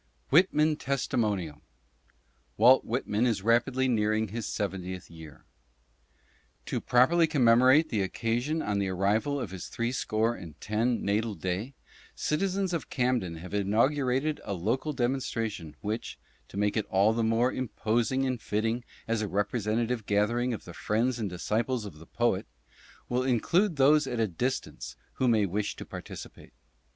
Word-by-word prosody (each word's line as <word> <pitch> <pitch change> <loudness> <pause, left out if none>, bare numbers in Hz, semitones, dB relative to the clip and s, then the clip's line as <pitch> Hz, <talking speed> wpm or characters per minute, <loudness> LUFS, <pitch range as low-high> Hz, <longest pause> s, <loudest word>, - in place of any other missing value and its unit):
] - - -37
Pitman 155 -1 +4
^testimonial. 105 - -1 1.0
WALT 125 +5 +6
WHITMAN 120 -1 0
IS 110 -5 -1
RAPIDLY 120 +3 +2
NEARING 110 -2 +1
HIS 115 +2 -4
SEVENTIETH 95 -3 -4
YEAR. 80 -4 -12 1.2
To - - -2
properly 160 +7 +4
commemorate 130 +2 +5
the 105 -4 0
occasion 120 +10 -1
on 105 -1 -1
the 100 - 0
arrival 105 +10 +1
of 115 -8 -5
his 95 -2 -7
Three 115 +1 -2
Score 115 -2 0
and 80 -8 -10
Ten 115 +3 0
Natal 105 +1 0
Day, 95 - -3 0.4
citizens 190 +3 -1
of 165 - -3
Camden 125 -9 0
have 90 +4 -9
inaugurated 130 +8 +1
a - - -4
local 115 - -1
demonstra 120 -3 -1
tion 80 -6 -9
which, 110 +3 -4 0.3
to - - -10
make 105 0 +1
it 110 - -1
all 100 +3 +3
the 115 0 0
more 115 +3 +2
imposing 120 +1 0
and 130 -3 -2
fitting 115 +4 -1 0.2
as 115 -1 0
a 105 - -1
representative 110 +3 -1
gathering 115 +5 +1
of 110 - -5
the 85 - -9
Friends 120 +7 0
and 105 -3 -2
Disciples 110 +6 -1
of 90 -7 -9
the 80 - -14
POET, - - 0 0.6
will 125 +1 0
include 165 - +2
those 145 +1 +4
at 120 -2 -3
a 110 - +3
distance 125 +9 -3 0.3
who 130 - +4
may 110 -4 +4
wish 100 +2 -2
to - - -8
participate. - - -10
115 Hz, 155 wpm, -28 LUFS, 105-130 Hz, 1.2 s, WALT